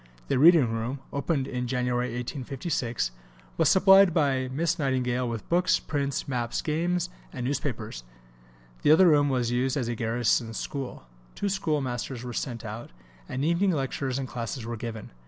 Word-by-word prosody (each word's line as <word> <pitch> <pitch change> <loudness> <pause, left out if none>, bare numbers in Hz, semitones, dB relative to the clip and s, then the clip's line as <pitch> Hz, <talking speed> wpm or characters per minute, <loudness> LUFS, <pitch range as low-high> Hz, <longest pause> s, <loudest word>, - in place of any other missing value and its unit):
The - - +2
reading 155 -7 +6
room, 115 +5 -3
opened 140 -1 -1
in 125 -2 -3
January 125 0 0
1856, 125 - -3 0.4
was - - +3
supplied 195 -2 +6
by 135 -5 +2
Miss 165 +5 0
Nightingale 125 -3 0
with 115 -3 -5
books, 180 +1 +3
prints, 140 -2 -2
maps, 120 -3 -2
games, 175 +3 0 0.2
and 125 -4 -5
newspapers. 125 - -3 0.8
The - - +2
other 175 +4 +7
room 145 -2 +4
was 125 -3 0
used 130 +3 0
as 125 -4 -1
a 120 - -1
garrison 115 0 0
school; 135 - -5 0.3
two 205 - -1
schoolmasters 135 -9 -2
were 125 -1 -6
sent 115 -2 -4
out; 110 +2 -6 0.4
and 135 +3 -2
evening 175 +3 +2
lectures 135 -2 -2
and 135 -1 -3
classes 115 -1 -5
were 120 0 -4
given. 115 -1 -6
130 Hz, 155 wpm, -27 LUFS, 120-150 Hz, 0.8 s, other